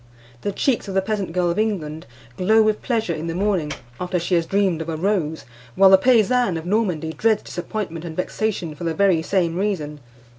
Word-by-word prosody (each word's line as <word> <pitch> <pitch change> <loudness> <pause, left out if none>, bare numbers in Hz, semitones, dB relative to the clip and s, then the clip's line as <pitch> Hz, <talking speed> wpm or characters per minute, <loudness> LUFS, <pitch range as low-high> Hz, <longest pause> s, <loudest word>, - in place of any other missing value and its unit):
The 205 - -2
cheeks 240 +2 0
of 195 - -5
the 190 - +3
peasant 200 -3 -2
girl 175 0 +1
of 170 - -2
England 165 -8 -2 0.3
glow 220 - +4
with 215 -1 +1
pleasure 225 -7 -1
in 160 +1 -5
the 165 - -3
morning 185 -6 0 0.3
after 180 0 -1
she 175 +2 -2
has 165 -2 +2
dreamed 195 -5 +1
of 160 - -5
a 160 - -3
rose, 165 -4 -1 0.3
while 195 0 +6
the 190 - +9
paysanne 240 -3 +3
of 160 - -7
Normandy 180 -6 0
dreads 220 +2 +1
disappointment 175 -2 -5
and 165 -2 -7
vexation 185 -3 -2
for 150 - -9
the 165 -1 -1
very 195 -5 +3
same 170 -1 0
reason. 165 -7 -2
185 Hz, 200 wpm, -22 LUFS, 165-210 Hz, 0.3 s, the